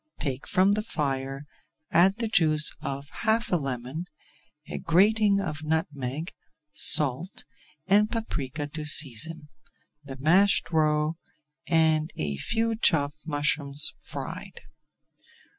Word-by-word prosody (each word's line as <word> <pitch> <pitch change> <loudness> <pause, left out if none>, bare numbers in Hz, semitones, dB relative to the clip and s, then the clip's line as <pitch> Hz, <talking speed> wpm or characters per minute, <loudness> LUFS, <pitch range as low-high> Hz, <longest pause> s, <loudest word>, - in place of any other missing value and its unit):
Take 135 -3 -4
from 190 +2 +3
the 210 +1 +1
fire, 135 -7 -4 0.5
add 185 +4 +4
the 230 -1 -2
juice 155 -7 +3
of 140 -2 -5
half 225 +1 +1
a - - +3
lemon, 135 +2 -4 0.6
a - - -5
grating 200 +4 +3
of 155 -5 -4
nutmeg, 155 -1 -3 0.4
salt 150 +6 +1 0.4
and 205 +2 +3
paprika 150 - -4
to 150 +1 -6
season, 150 +2 +3 0.5
the 135 -2 -9
mashed 180 +10 +3
roe, 155 0 +1 0.5
and 160 -1 +2
a 75 -2 -3
few 225 - -1
chopped 155 -8 +1
mushrooms 145 -1 +1
fried. - - -7
155 Hz, 110 wpm, -26 LUFS, 140-185 Hz, 0.6 s, add